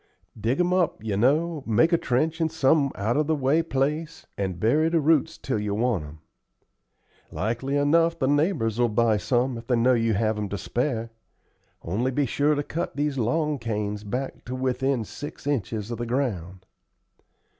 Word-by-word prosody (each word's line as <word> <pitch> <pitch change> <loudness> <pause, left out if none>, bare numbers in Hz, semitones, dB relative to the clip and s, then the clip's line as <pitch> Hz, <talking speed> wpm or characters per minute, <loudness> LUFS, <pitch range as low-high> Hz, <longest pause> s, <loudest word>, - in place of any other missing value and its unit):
Dig 115 +6 -1
'em 180 0 +2
up, 175 - 0
you 105 -3 -2
know; 150 +8 +2
make 160 +10 +3
a - - +6
trench 155 +7 0
in 160 - +2
some 145 -2 +2
out 110 +4 -1
of 150 -1 +1
the 160 - +2
way 140 +3 +2
place, 150 +1 -2
and 95 -3 -3
bury 150 - +3
the 165 0 +2
roots 160 +1 +2
till 130 -5 -2
you 105 -1 -2
want 115 -6 0
'em. 75 +1 -10 1.1
Like 115 +4 -2
enough 145 +5 +2
the 130 - 0
neighbors 145 - +1
will 120 -1 +3
buy 110 0 +2
some 120 +2 0
if 115 - -13
they 125 - +2
know 120 +2 +4
you 115 -2 +1
have 110 +1 0
'em 105 -1 -3
to 100 - -3
spare. 115 - -2 0.7
Only 110 +10 -1
be 140 +2 0
sure 145 +4 +1
to 145 - -1
cut 165 0 -4
these 145 -1 -1
long 150 +5 0
canes 105 -2 -3
back 125 +6 -4
to 125 - -4
within 130 -1 0
six 145 +7 -9
inches 115 -5 -2
of 120 - -4
the 120 - -3
ground." 95 -8 -2
130 Hz, 185 wpm, -25 LUFS, 110-150 Hz, 1.1 s, a